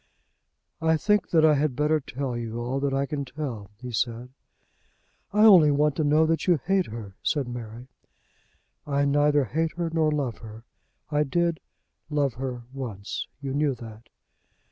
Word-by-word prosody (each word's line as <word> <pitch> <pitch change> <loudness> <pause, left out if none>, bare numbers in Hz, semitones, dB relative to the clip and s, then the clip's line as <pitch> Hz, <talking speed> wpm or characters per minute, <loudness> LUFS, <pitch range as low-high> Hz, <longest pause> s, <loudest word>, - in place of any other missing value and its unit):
"I 160 0 +3
think 210 +4 +1
that 160 -2 +4
I 155 - +6
had 145 -2 0
better 150 +3 +2
tell 135 -2 -4
you 115 -1 -4
all 125 +3 -2
that 140 0 0
I 135 +1 0
can 145 0 -3
tell," 130 -8 -6
he 125 +2 -8
said. 120 +2 -2 1.0
"I 210 +2 +5
only 180 -8 +8
want 145 0 +2
to 155 - +1
know 150 +2 +4
that 165 +3 0
you 175 -2 +5
hate 190 +6 0
her," 110 -3 -8
said 145 -4 0
Mary. 120 0 -7 1.0
"I 140 0 +1
neither 145 0 +3
hate 160 +7 -1
her 170 -1 -3
nor 160 -2 +2
love 140 -6 -2
her. 110 0 -11 0.5
I 150 0 +2
did 170 +3 0 0.5
love 145 -4 +1
her 125 -1 -5
once. 115 -8 -5
You 135 -1 -4
knew 145 -1 +1
that." 115 -1 -12
140 Hz, 165 wpm, -26 LUFS, 120-155 Hz, 1.0 s, only